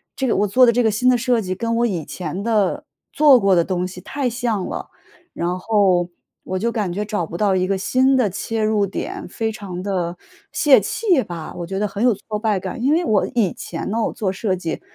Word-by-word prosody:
这 265 - -2
个 240 - +2
我 205 - +2
做 250 +6 +5
的 235 - +5
这 245 +1 +2
个 220 - +3
新 250 +5 +2
的 250 - +4
设 240 -1 +1
计 185 -2 -3
跟 230 +4 -2
我 235 +1 +2
以 175 -9 -2
前 180 +1 -5
的 215 -4 0 0.3
做 295 -4 +6
过 195 -4 +3
的 170 -1 +3
东 180 -1 -1
西 185 0 -8
太 265 +7 -2
像 230 -5 -2
了。 - - -5 0.4
然 175 +1 -2
后 185 -4 +2 0.3
我 185 - -3
就 235 +3 0
感 210 -6 -2
觉 205 +4 -3
找 210 -5 -2
不 165 - -7
到 200 0 +2
一 185 0 +1
个 195 -1 0
新 260 +6 +2
的 235 -5 +2
切 220 +4 -3
入 215 -2 +2
点， 195 - -5
非 225 +4 -2
常 190 -4 -7
地 180 -3 -2 0.3
泄 295 -3 +5
气 380 - +1
吧， 165 -3 -7
我 175 - -5
觉 195 +1 -4
得 210 - +1
很 200 +2 -4
有 245 -2 +5
挫 210 +2 -5
败 210 -3 0
感。 235 +5 -6
因 280 +3 +3
为 340 +2 +1
我 210 -7 +2
以 210 -7 +2
前 165 +2 -6
呢， 225 +2 0
我 - - -1
做 200 -3 -2
设 195 0 -1
计， 165 -3 -4
210 Hz, 255 characters per minute, -21 LUFS, 185-235 Hz, 0.4 s, 做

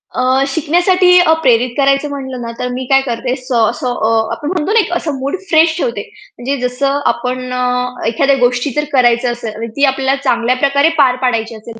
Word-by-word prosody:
अ, 260 +1 +2
शिकण्यासाठी 355 +5 +3
अ, 355 -3 +4
प्रेरित 250 -3 +3
करायचं 275 +1 +2
म्हंटलं 265 -3 -6
ना, 230 -1 -5
तर 250 - -2
मी 255 +1 -4
काय 270 0 +4
करते 245 +1 -2
स 255 -2 -14
स - - -8
अ, 225 -2 +3
असं 225 -5 -1
आपण 295 - -5
म्हणतो 365 +1 -2
ना, 455 - +5
एक 375 - -1
असं 305 -4 -4
मूड 275 +7 -2
फ्रेश 320 0 +4
ठेवते. 470 +6 -2 0.4
म्हणजे 265 +3 -3
जसं 275 +3 -1
आपण 255 +1 -5
अ, 250 - -1 0.4
एखाद्या 275 +5 +2
गोष्टी 245 +2 +1
जर 300 - +1
करायचं 240 -2 +2
असेल 235 -3 -6
आणि 230 +1 -5
ती 280 - 0
आपल्याला 270 0 0
चांगल्या 240 -1 +1
प्रकारे 280 +3 +2
पार 265 -4 +4
पाडायची 230 -3 -1
असेल 225 +1 -11
260 Hz, 205 wpm, -15 LUFS, 245-285 Hz, 0.4 s, ना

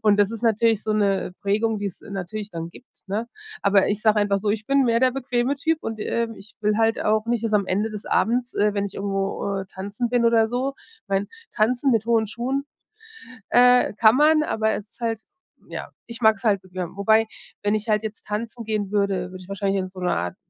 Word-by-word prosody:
Und 210 -2 +4
das 205 0 +4
ist 230 -1 -7
natürlich 225 -1 +2
so 215 - -1
'ne 200 -3 +1
Prägung, 215 +2 0
die 205 - -3
es 190 - -7
natürlich 200 +2 -6
dann 165 -2 -5
gibt, 250 - -18
ne? 215 +4 -2 0.3
Aber 200 -1 +4
ich 205 +1 -2
sage 215 -1 +4
einfach 205 -1 +2
so: 205 +1 -1
„Ich 215 0 -2
bin 275 0 +3
mehr 230 -1 +2
der 255 -1 +4
bequeme 255 0 -1
Typ“ 320 +3 0
und, 225 -1 -5
ähm, 230 +1 -1
ich 200 +2 -13
will 210 0 +1
halt 225 0 +2
auch 215 0 +2
nicht, 235 -1 0
dass 225 - -1
am 200 -2 +2
Ende 205 +4 0
des 210 -1 -7
Abends, 245 +2 0
äh, 210 0 +2
wenn 200 0 0
ich 200 - -6
irgendwo, 195 0 -2
äh, - - -5
tanzen 205 +5 -3
bin 245 -1 +2
oder 225 -1 +4
so 260 +3 -2 0.3
Ich - - -66
meine, 195 +1 0 0.3
Tanzen 245 +5 +2
mit 225 -1 +1
hohen 230 -2 +3
Schuhen, 255 +6 -2 0.9
äh, 250 -1 +5
kann 220 +2 +5
man, 305 +1 +5
aber 220 -6 0
es 210 0 -5
ist - - -21
halt 225 -2 -1 0.5
ja, - - -6 0.2
ich 235 0 -8
mags 220 -3 +4
halt 200 -4 +2
bequem 185 -1 -6
wobei, 220 +2 +4 0.4
wenn 205 +1 +2
ich 215 +1 -3
halt 210 0 +2
jetzt 220 0 -7
tanzen 230 +3 -4
gehen 210 -2 -2
würde, 195 -3 0
würde 185 0 -9
ich 180 - -16
wahrscheinlich 195 0 -1
in 185 - -5
so 185 0 -11
'ner 180 - +1
Art 90 +1 -3
215 Hz, 230 wpm, -23 LUFS, 200-230 Hz, 0.9 s, äh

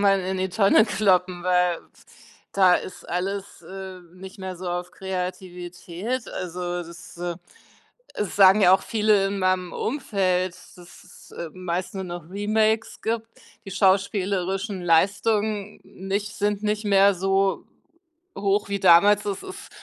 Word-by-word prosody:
man 195 -1 +4
in 185 +1 -3
die 190 0 -1
Tonne 200 +3 +4
kloppen, 185 -4 +1
weil 180 -1 +2 0.7
da 185 -2 +5
ist 185 - -9
alles, 195 +3 -3
äh, 190 -1 -9
nicht 190 +2 -11
mehr 190 -1 -6
so 180 0 -6
auf 175 0 -4
Kreativität. 185 +4 -5
Also, 175 0 -4
das, 170 +1 -12
äh 175 -1 -3 0.8
es 210 - -3
sagen 195 +1 +7
ja 185 -1 +7
auch - - +3
viele 210 -3 +2
in 200 0 -3
meinem 185 -1 0
Umfeld, 185 -8 -1 0.2
dass - - -20 0.3
es, - - -17
äh, 170 -2 -6
meist 180 0 -4
nur 190 - -4
noch 175 -3 -7
Remakes 215 +2 0
gibt. 225 0 -2 0.4
Die - - -7
schauspielerischen 195 0 0
Leistungen 205 +4 +1
nicht 200 +3 -4
sind 205 0 -1
nicht 210 0 -1
mehr 200 0 +5
so 195 +1 0 0.7
hoch 200 +1 0
wie 200 0 -1
damals, 200 +4 +6
es 200 -2 -3
ist 385 +1 -10
190 Hz, 140 wpm, -24 LUFS, 180-205 Hz, 0.8 s, sagen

